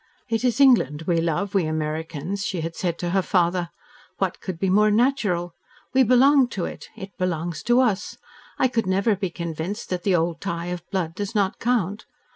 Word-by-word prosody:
"It 230 Hz, 0 st, -1 dB
is 245 Hz, -1 st, +1 dB
England 185 Hz, -, +4 dB
we 170 Hz, 0 st, +1 dB
love, 170 Hz, +4 st, -1 dB
we 190 Hz, -5 st, +2 dB
Americans," 155 Hz, +4 st, -3 dB
she 185 Hz, -5 st, -2 dB
had 165 Hz, +1 st, -4 dB
said 170 Hz, -2 st, -2 dB
to 175 Hz, -1 st, -3 dB
her 195 Hz, +1 st, +3 dB
father. 175 Hz, -2 st, +1 dB, 0.5 s
"What -, -, -1 dB
could 185 Hz, -3 st, -5 dB
be 190 Hz, -, -1 dB
more 210 Hz, +3 st, +4 dB
natural? 205 Hz, -7 st, +1 dB, 0.4 s
We 265 Hz, -, +5 dB
belong 260 Hz, +2 st, +5 dB
to 180 Hz, -, -1 dB
it -, -, -8 dB
it 195 Hz, -3 st, -9 dB
belongs 170 Hz, -3 st, -2 dB
to 240 Hz, +2 st, +6 dB
us. 205 Hz, -6 st, -1 dB, 0.4 s
I 260 Hz, -, +3 dB
could 230 Hz, -5 st, -1 dB
never 195 Hz, +3 st, +2 dB
be 190 Hz, -1 st, -3 dB
convinced 170 Hz, +5 st, -5 dB
that 180 Hz, -1 st, -1 dB
the 190 Hz, 0 st, +2 dB
old 165 Hz, 0 st, 0 dB
tie 170 Hz, +1 st, -3 dB
of 175 Hz, 0 st, -9 dB
blood 180 Hz, -5 st, -2 dB
does 205 Hz, +4 st, -5 dB
not 200 Hz, -2 st, +1 dB
count. 220 Hz, -4 st, 0 dB
185 Hz, 195 wpm, -24 LUFS, 170-215 Hz, 0.5 s, to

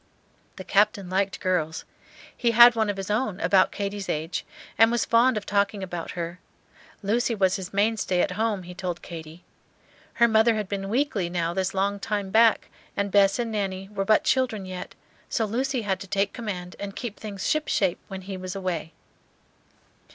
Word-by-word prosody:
The 190 Hz, -, -8 dB
Captain 200 Hz, -1 st, +2 dB
liked 195 Hz, +1 st, 0 dB
girls. 165 Hz, -4 st, -1 dB, 0.5 s
He 240 Hz, -, +1 dB
had 240 Hz, 0 st, +10 dB
one 220 Hz, -2 st, +1 dB
of 205 Hz, -, -2 dB
his 195 Hz, +1 st, -4 dB
own, 210 Hz, -3 st, -1 dB
about 190 Hz, -2 st, +4 dB
Katy's 200 Hz, -1 st, -4 dB
age, 160 Hz, +3 st, -2 dB, 0.3 s
and 225 Hz, +1 st, +5 dB
was 240 Hz, -1 st, +1 dB
fond 235 Hz, +1 st, +4 dB
of 205 Hz, -, -4 dB
talking 200 Hz, 0 st, 0 dB
about 175 Hz, -3 st, -5 dB
her. 170 Hz, +1 st, -4 dB, 0.6 s
Lucy 230 Hz, +3 st, +1 dB
was 190 Hz, -1 st, +2 dB
his 190 Hz, -2 st, -7 dB
mainstay 200 Hz, -2 st, +1 dB
at 185 Hz, -, +2 dB
home, 210 Hz, -1 st, -1 dB
he 180 Hz, +1 st, -9 dB
told 180 Hz, -1 st, -5 dB
Katy. 165 Hz, 0 st, -9 dB, 0.7 s
Her 235 Hz, -, +4 dB
mother 220 Hz, 0 st, +4 dB
had 210 Hz, -2 st, -2 dB
been 195 Hz, -1 st, -4 dB
"weakly" 225 Hz, -7 st, 0 dB
now 170 Hz, -1 st, -1 dB
this 190 Hz, +1 st, -1 dB
long 200 Hz, +1 st, 0 dB
time 200 Hz, -1 st, -3 dB
back, 225 Hz, +1 st, +4 dB, 0.3 s
and 200 Hz, 0 st, -1 dB
Bess 195 Hz, -1 st, +4 dB
and 235 Hz, -2 st, -2 dB
Nanny 195 Hz, -2 st, -3 dB
were 205 Hz, -2 st, -2 dB
but 215 Hz, +2 st, +3 dB
children 250 Hz, -7 st, +1 dB
yet, 185 Hz, -1 st, -7 dB, 0.3 s
so 225 Hz, -, 0 dB
Lucy 255 Hz, +3 st, -1 dB
had 190 Hz, -2 st, -1 dB
to 195 Hz, -, -8 dB
take 195 Hz, +1 st, 0 dB
command 185 Hz, -7 st, -5 dB
and 200 Hz, -1 st, -6 dB
keep 235 Hz, -5 st, -6 dB
things 205 Hz, -3 st, -5 dB
ship 310 Hz, 0 st, +1 dB
shape 190 Hz, -4 st, +1 dB
when 190 Hz, -1 st, -7 dB
he 190 Hz, 0 st, -6 dB
was 185 Hz, +1 st, -6 dB
away. 180 Hz, -4 st, -3 dB
200 Hz, 185 wpm, -25 LUFS, 185-220 Hz, 0.7 s, had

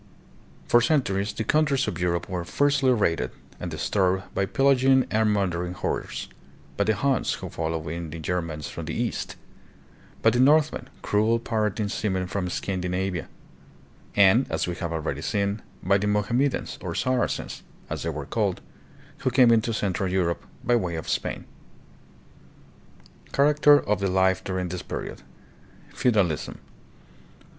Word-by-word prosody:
For 120 Hz, -, +5 dB
centuries 105 Hz, -8 st, +1 dB
the 110 Hz, -, -3 dB
countries 140 Hz, +1 st, +2 dB
of -, -, -3 dB
Europe 85 Hz, -1 st, 0 dB
were 90 Hz, -2 st, -3 dB
fiercely 140 Hz, +6 st, +2 dB
raided 100 Hz, -9 st, +1 dB, 0.3 s
and -, -, -4 dB
disturbed 95 Hz, -1 st, 0 dB
by 95 Hz, -, 0 dB
pillaging 135 Hz, 0 st, +4 dB
and 110 Hz, 0 st, +3 dB
mur 100 Hz, -1 st, +2 dB
dering 90 Hz, 0 st, -3 dB
hordes; -, -, -3 dB, 0.5 s
by 100 Hz, -, +1 dB
the 110 Hz, +1 st, +2 dB
Huns, 135 Hz, +5 st, +1 dB
who -, -, -6 dB
followed 80 Hz, -1 st, -3 dB
in 85 Hz, +1 st, -4 dB
the 80 Hz, -, -7 dB
Germans 80 Hz, -2 st, -3 dB
from -, -, -6 dB
the -, -, -4 dB
East; -, -, -2 dB, 0.9 s
by -, -, +6 dB
the 120 Hz, -, 0 dB
Northmen, 150 Hz, +3 st, +3 dB
cruel 110 Hz, +3 st, +2 dB
pirating 110 Hz, -3 st, -1 dB
seamen 95 Hz, -3 st, -1 dB
from 90 Hz, 0 st, -3 dB
Scandinavia; 90 Hz, -1 st, -2 dB, 0.9 s
and, 100 Hz, +6 st, +5 dB
as -, -, 0 dB
we 90 Hz, -, -3 dB
have 85 Hz, -3 st, -3 dB
already 80 Hz, -3 st, -3 dB
seen, 100 Hz, +2 st, -1 dB, 0.2 s
by 100 Hz, +2 st, +3 dB
the 105 Hz, -, -1 dB
Mohammedans, 115 Hz, +7 st, 0 dB
or -, -, -4 dB
Saracens 130 Hz, -1 st, -1 dB, 0.3 s
as -, -, -4 dB
they -, -, -2 dB
were -, -, -4 dB
called, -, -, -1 dB, 0.6 s
who -, -, +1 dB
came 125 Hz, -2 st, +5 dB
into 115 Hz, 0 st, +3 dB
central 95 Hz, -3 st, -1 dB
Europe 85 Hz, -3 st, 0 dB, 0.2 s
by 120 Hz, -, +3 dB
way 90 Hz, -7 st, -1 dB
of 80 Hz, -, -5 dB
Spain. -, -, -2 dB, 1.9 s
Character 145 Hz, +1 st, +5 dB
of 105 Hz, -5 st, -1 dB
the 100 Hz, -1 st, 0 dB
Life 95 Hz, 0 st, +2 dB
during 95 Hz, -1 st, -2 dB
this 90 Hz, 0 st, -4 dB
Period. -, -, -6 dB, 0.7 s
Feudalism. 100 Hz, -, +1 dB
100 Hz, 150 wpm, -25 LUFS, 90-120 Hz, 1.9 s, by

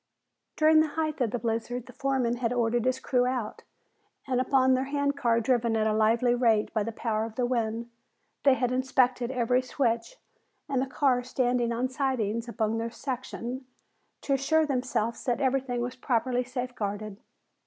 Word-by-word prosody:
During 310 Hz, 0 st, +5 dB
the 315 Hz, -, +4 dB
height 310 Hz, -3 st, -1 dB
of 240 Hz, -, +2 dB
the 245 Hz, -, -2 dB
blizzard 230 Hz, +1 st, -3 dB
the 250 Hz, -, -13 dB
foreman 265 Hz, -3 st, 0 dB
had 235 Hz, -1 st, -1 dB
ordered 240 Hz, -1 st, +1 dB
his 255 Hz, 0 st, +1 dB
crew 250 Hz, -2 st, +1 dB
out 250 Hz, -4 st, -3 dB, 0.6 s
and 255 Hz, -2 st, +1 dB
upon 260 Hz, 0 st, +3 dB
their 260 Hz, +1 st, +1 dB
hand 285 Hz, 0 st, 0 dB
car 235 Hz, -5 st, +2 dB
driven 235 Hz, -1 st, +1 dB
at 215 Hz, -, +1 dB
a 215 Hz, -, +2 dB
lively 225 Hz, +3 st, +3 dB
rate 230 Hz, -3 st, +2 dB
by 215 Hz, -, +1 dB
the 225 Hz, +2 st, -2 dB
power 220 Hz, -1 st, -1 dB
of 225 Hz, -1 st, -6 dB
the 250 Hz, -, +1 dB
wind 230 Hz, -1 st, -1 dB, 0.5 s
they 275 Hz, -2 st, +5 dB
had 250 Hz, -1 st, 0 dB
inspected 255 Hz, -1 st, +1 dB
every 250 Hz, -1 st, +1 dB
switch 245 Hz, -, -1 dB, 0.5 s
and 270 Hz, -2 st, -1 dB
car 260 Hz, -3 st, +2 dB
standing 245 Hz, -1 st, 0 dB
on 240 Hz, +2 st, 0 dB
sidings 245 Hz, -4 st, -1 dB
upon 220 Hz, 0 st, -1 dB
their 230 Hz, +1 st, -2 dB
section, 255 Hz, 0 st, -5 dB, 0.5 s
to 280 Hz, -, -1 dB
assure 315 Hz, +4 st, +2 dB
themselves 250 Hz, -4 st, -1 dB
that 245 Hz, 0 st, 0 dB
everything 260 Hz, -2 st, 0 dB
was 245 Hz, +1 st, -3 dB
properly 250 Hz, 0 st, 0 dB
safeguarded. 220 Hz, -5 st, -4 dB
245 Hz, 170 wpm, -28 LUFS, 230-260 Hz, 0.6 s, During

